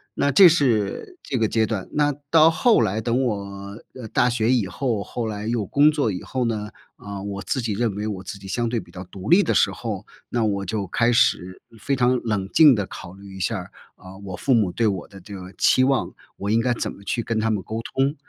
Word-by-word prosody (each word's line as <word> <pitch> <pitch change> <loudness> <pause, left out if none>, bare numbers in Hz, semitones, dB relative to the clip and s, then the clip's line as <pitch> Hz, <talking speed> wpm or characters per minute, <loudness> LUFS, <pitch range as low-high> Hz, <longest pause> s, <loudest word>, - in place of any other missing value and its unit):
那 145 - +1
这 180 +3 +9
是 135 - 0
这 130 - -3
个 110 -1 +2
阶 110 0 +1
段。 100 -4 -4
那 145 -1 +2 0.2
到 160 +1 +6
后 235 +6 +3
来 105 +4 0
等 120 +4 0
我， 100 -2 -4 0.2
呃， 125 -3 -8
大 125 - +2
学 120 0 +1
以 115 -7 +2
后， 110 +3 -2
后 120 +3 -4
来 105 0 -5
又 115 -3 -1
工 145 +9 +4
作 145 -8 0
以 90 - -5
后 130 -1 -2
呢， 105 -2 -3 0.3
呃， 100 -1 -7
我 100 -1 -5
自 130 - -2
己 115 -2 -2
认 105 -1 -1
为 105 +1 -3
我 100 -3 -4
自 100 - -8
己 100 - -14
相 120 +4 -1
对 115 -1 -1
比 - - -17
较 90 - -8
独 95 +3 -8
立 195 +3 +6
的 - - 0
时 - - +3
候， 110 -5 -5 0.2
那 120 -2 -1
我 100 -2 -1
就 100 +1 -2
开 115 +6 +1
始 95 -5 +1 0.2
非 140 +6 -1
常 125 0 +2
冷 100 -4 -2
静 150 -6 +6
地 100 -2 -2
考 90 -1 -10
虑 100 0 -12
一 - - -9
下 110 +5 -1
儿， 90 - -10 0.2
啊， 95 +1 -13
我 95 -1 -5
父 135 +5 +1
母 105 -6 +2
对 115 - 0
我 95 -4 -2
的 95 -2 -14
这 100 +2 -11
个 95 0 -9
期 130 - +4
望， 135 0 0 0.2
我 100 - -5
应 115 - +3
该 120 +1 +1
怎 - - -3
么 - - -14
去 115 +2 -1
跟 115 -1 -1
他 110 +1 0
们 105 -4 -1
沟 110 +1 -5
通。 135 +5 -1
110 Hz, 265 characters per minute, -23 LUFS, 100-125 Hz, 0.3 s, 这